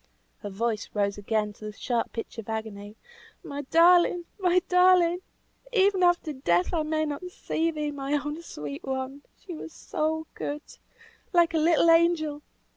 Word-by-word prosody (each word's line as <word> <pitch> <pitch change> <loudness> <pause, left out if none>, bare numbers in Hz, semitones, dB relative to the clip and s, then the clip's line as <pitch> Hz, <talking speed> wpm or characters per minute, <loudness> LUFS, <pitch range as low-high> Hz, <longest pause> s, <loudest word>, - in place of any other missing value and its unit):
Her 205 - -6
voice 220 +2 -2
rose 200 0 0
again 210 0 -1
to 215 - -12
the 210 - -5
sharp 235 +2 -2
pitch 230 0 -6
of 225 - -8
agony. 215 -2 -5 0.5
"My 285 0 -5
darling! 345 +1 +5
my 365 -1 +3
darling! 360 -1 +4 0.5
even 395 -3 +3
after 350 -3 +2
death 180 - +1
I 330 - +1
may 310 0 0
not 295 +3 -4
see 330 -2 -2
thee, 300 -2 -3
my 280 0 -4
own 295 +2 -2
sweet 145 - -7
one! 265 +1 -4 0.2
She 365 - -6
was 325 0 -8
so 315 +1 -2
good 295 +1 -5 0.7
like 340 -1 +4
a 320 - +2
little 330 +1 +4
angel. 330 -3 +2
300 Hz, 160 wpm, -27 LUFS, 225-340 Hz, 0.7 s, darling